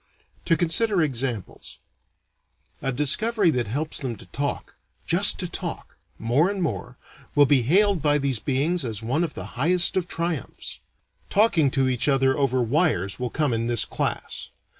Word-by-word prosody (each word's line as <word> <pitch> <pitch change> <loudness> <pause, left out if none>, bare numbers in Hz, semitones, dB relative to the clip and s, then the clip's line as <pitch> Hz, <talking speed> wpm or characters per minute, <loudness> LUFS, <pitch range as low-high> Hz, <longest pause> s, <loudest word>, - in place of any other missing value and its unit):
To 165 - +2
consider 180 +2 +2
examples: 125 - -3 1.0
A 135 - -1
discovery 180 - +2
that 125 -5 -2
helps 150 +8 -2
them 130 -5 -4
to 100 - -13
talk, 140 0 -4 0.3
just - - +4
to - - -2
talk, - - -5 0.2
more 130 +10 +1
and 200 -1 -4
more, 125 -7 -4 0.4
will 145 -1 +6
be 140 -2 +3
hailed 190 - +3
by 145 0 +3
these 135 -5 -1
beings 145 +7 0
as 110 -3 -4
one 135 +9 0
of 165 - -4
the 95 - -5 0.2
highest 175 +3 +3
of 185 -2 -1
triumphs. 165 - -4 0.5
Talking 195 -9 +3
to 135 -1 +3
each 125 +1 0
other 135 -1 +2
over 130 -3 +1
wires 120 - 0
will 125 -1 -2
come 145 -1 -1
in 115 0 -1
this 120 -2 +5
class. - - -4
140 Hz, 160 wpm, -24 LUFS, 125-170 Hz, 1.0 s, will